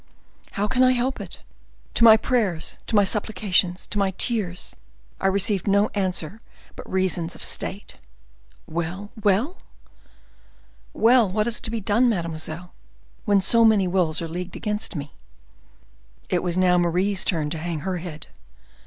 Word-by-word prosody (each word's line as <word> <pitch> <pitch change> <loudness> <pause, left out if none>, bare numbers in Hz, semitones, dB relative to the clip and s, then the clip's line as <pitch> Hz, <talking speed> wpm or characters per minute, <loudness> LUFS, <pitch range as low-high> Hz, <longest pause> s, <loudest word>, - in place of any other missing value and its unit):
"How 205 +1 0
can 255 +4 +1
I 255 0 +6
help 255 +2 -1
it? - - -10 0.5
To - - +2
my 220 -1 +9
prayers, 215 -8 -1
to - - 0
my 205 - +6
supplications, 195 -3 0
to 205 - -3
my 195 -1 +2
tears, 195 -7 -2 0.4
I 195 - +1
received 195 0 0
no 200 +1 +3
answer 190 0 -2 0.3
but - - -10
reasons 185 -2 0
of - - -10
state." 200 - -5 0.7
"Well, 175 +5 -4
well?" 215 - +1 1.3
"Well, 230 -2 +4
what 210 +3 0
is 235 0 -2
to - - -2
be 225 -1 -3
done, 230 +5 +3
mademoiselle, 170 -2 -3 0.5
when 205 -3 +3
so 230 +4 +4
many 215 -4 +4
wills 175 -3 0
are - - -3
leagued 180 +3 -6
against 210 -2 -3
me?" 145 -1 -6 1.2
It 180 - +1
was 180 -1 -1
now 180 -1 +4
Marie's 185 +3 +1
turn 155 -5 0
to 160 - -3
hang 165 -2 -4
her 185 +1 -2
head. 160 -3 -6
195 Hz, 155 wpm, -24 LUFS, 175-215 Hz, 1.3 s, my